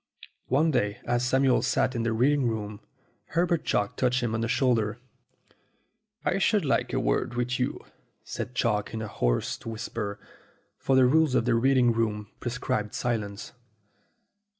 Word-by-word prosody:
One 155 +5 +3
day, 105 -6 0
as 120 0 0
Samuel 130 +1 +3
sat - - +1
in 120 - -2
the 115 0 0
reading 130 +4 +2
room, 105 -2 -3 0.6
Her 170 +1 +4
bert 170 -3 0
Chalk 100 0 0
touched 125 -1 +1
him 115 -2 -1
on 110 - -1
the 115 - 0
shoulder. 120 -4 +1 1.3
"I - - +1
should - - +2
like - - +1
a - - 0
word - - 0
with 125 +1 -1
you," 125 - -2 0.4
said 125 - -6
Chalk, 110 -2 0
in 110 - -3
a - - -4
hoarse - - -1
whisper, 110 -2 -5 0.6
for 135 - +1
the 130 -1 +6
rule 150 0 +3
of 115 - +1
the 125 - +2
reading 125 +1 +4
room 105 -2 -2
pre 120 - -3
scribed 125 -3 -2
silence. 105 -4 -3
120 Hz, 165 wpm, -27 LUFS, 110-130 Hz, 1.3 s, the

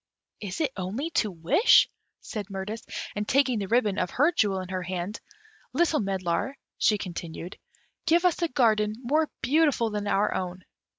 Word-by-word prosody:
"Is 200 - -4
it 290 -4 +1
only 210 - -3
to 230 -10 +1
wish?" 175 - +5 0.3
said 210 -2 -6
Mirtis; 200 +3 -5 0.3
and 210 0 -2
taking 260 -4 +3
the 200 - -3
ribbon 215 -3 +2
of 180 - 0
her 295 - +3
jewel 205 - +1
in 185 -1 -6
her 185 -1 -2
hand, 185 +3 -4 0.5
"Little 330 -3 +2
medlar," 195 +6 -1 0.2
she 210 - +4
continued, 175 -2 -7 0.5
"give 340 +3 +4
us 355 -1 +2
a 340 - +2
garden 215 -6 +2
more 305 +5 +2
beautiful 285 -6 +3
than 210 0 -3
our 205 +1 +2
own." 185 0 -4
210 Hz, 165 wpm, -27 LUFS, 190-275 Hz, 0.5 s, wish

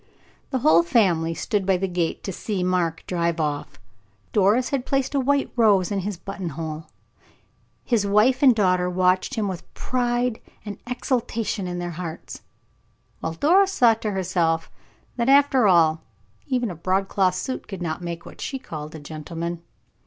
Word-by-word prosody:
The 265 - 0
whole 160 +2 +7
family 170 -3 +2
stood 210 +1 -1
by 190 -1 +2
the 195 +2 -1
gate 175 -2 -2
to 195 - -3
see 195 0 -3
Mark 180 -3 0
drive 170 -2 -1
off. 150 -2 -3 0.5
Doris 210 +5 +3
had 275 -3 -1
placed 270 +1 -1
a 280 - +2
white 280 +1 +1
rose 210 -5 +3
in 200 - 0
his 195 0 -4
buttonhole; 165 -4 -6 1.0
his 230 -5 +1
wife 210 +6 +3
and 260 -4 +6
daughter 180 -4 +2
watched 185 +6 +1
him 215 -3 -1
with 185 -3 -6
pride 245 -1 -1 0.2
and 205 -2 -6
exultation 230 -5 -2
in 175 0 -4
their 175 0 -4
hearts, 165 -3 -7 0.8
while 160 - -3
Doris 380 - +3
thought 225 -2 +4
to 215 - -1
herself 175 -4 0 0.5
that, 235 +1 +1
after 275 -4 +5
all, 165 -3 +4 0.5
even 245 -5 0
a - - -7
broadcloth 190 +2 +1
suit 255 +8 -4
could 190 -3 -6
not 160 +1 -3
make 170 -1 -6
what - - -12
she 270 - -3
called 155 - -8
a - - -7
gentleman. 165 +3 -6
190 Hz, 160 wpm, -23 LUFS, 170-235 Hz, 1.0 s, whole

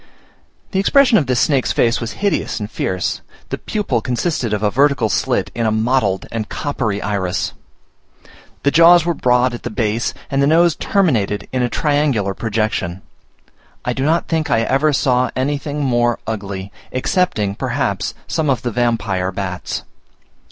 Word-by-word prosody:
The 190 - 0
expression 245 +2 +5
of 140 - -2
this 125 -2 +1
snake's 140 -3 +2
face 115 +1 +2
was 115 - -4
hideous 200 -10 0
and 105 +1 -5
fierce; 95 -1 -2 0.3
the - - -3
pupil 190 - -1
consisted 125 0 -1
of 105 0 -1
a 105 - +2
vertical 135 -3 +2
slit - - 0
in 115 -1 0
a - - +2
mottled 110 -3 +1
and 110 -2 -3
coppery 120 -8 -2
iris; 100 -3 -1 1.1
the 140 - +3
jaws 170 +1 +6
were 170 - +1
broad 125 -3 +2
at 120 - -6
the - - -4
base, 110 +1 -1 0.2
and 135 0 +1
the 140 - +3
nose 170 +2 +4
terminated 120 - 0
in 130 - +1
a 120 - +1
triangular 145 -11 +1
projection. 105 -4 -2 0.8
I 125 - 0
do 130 - -2
not 160 +4 +1
think 160 -2 -1
I 115 -3 +3
ever 135 +6 +2
saw 125 -2 +2
anything 145 +2 -2
more 120 -2 +2
ugly, 100 -3 -5 0.2
excepting, 130 - 0
perhaps, - - -2
some 155 -2 -1
of 130 -3 0
the 120 - -1
vampire 105 -6 0
bats. 90 -1 -4
125 Hz, 160 wpm, -18 LUFS, 105-145 Hz, 1.1 s, jaws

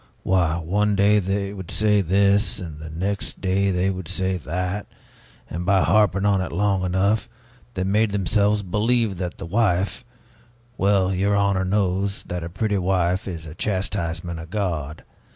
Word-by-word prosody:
Why, 85 -3 +2
one 100 +5 +1
day 100 +2 +4
they 100 +1 -2
would 95 -4 -8
say 105 -1 +2
this, 100 +3 +2
and 80 -4 -7
the 80 +1 -8
next 95 +6 -3
day 100 +1 +1
they 95 +1 +1
would 95 -3 -6
say 95 0 -1
that, 90 +5 -3 0.6
and 85 +2 -4
by 95 +1 +3
harping 100 -2 +3
on 100 -2 +3
it 95 - -4
long 100 +1 +1
enough, 95 +4 +1 0.5
they 95 - -1
made 105 +3 +2
themselves 100 +1 +1
believe 105 +2 +1
that 90 -2 -4
the - - -7
wife 100 0 0 0.7
Well, 95 -3 +2
your 100 +2 +1
honor 100 -2 +2
knows 100 0 0
that 90 -1 -5
a 85 - -5
pretty 105 +3 -1
wife 90 +1 0
is 85 -4 -5
a 80 - -8
chastisement 85 -3 -2
of 80 0 -9
God. 85 -7 -3
95 Hz, 165 wpm, -23 LUFS, 90-100 Hz, 0.7 s, day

